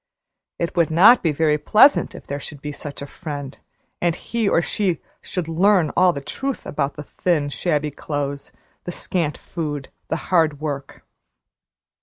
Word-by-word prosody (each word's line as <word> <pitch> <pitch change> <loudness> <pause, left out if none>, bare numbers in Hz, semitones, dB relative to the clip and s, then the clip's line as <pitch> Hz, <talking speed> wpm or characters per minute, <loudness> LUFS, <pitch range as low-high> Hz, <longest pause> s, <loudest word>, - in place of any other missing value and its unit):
It 170 - -2
would 170 -2 +3
not 195 +10 +7
be 165 - +2
very 150 0 +2
pleasant 220 - +5
if - - -10
there 140 +1 -4
should 145 0 -8
be 150 +1 -5
such 145 -1 -7
a - - -5
friend, 145 -3 -7 0.4
and 170 -1 +2
he 230 0 -1
or - - +4
she 180 -1 0 0.2
should 180 -3 -4
learn 175 0 +3
all 185 -1 +5
the 140 - -5
truth 270 - -4
about 140 -1 -2
the 150 - -7
thin, 150 -2 0
shabby 150 -1 -1
clothes, 145 -1 -4 0.3
the 175 - -3
scant 170 -3 -2
food, 145 -5 -5 0.2
the - - -1 0.2
hard 160 -5 +3
work. 140 -3 -5
155 Hz, 165 wpm, -22 LUFS, 145-175 Hz, 0.4 s, not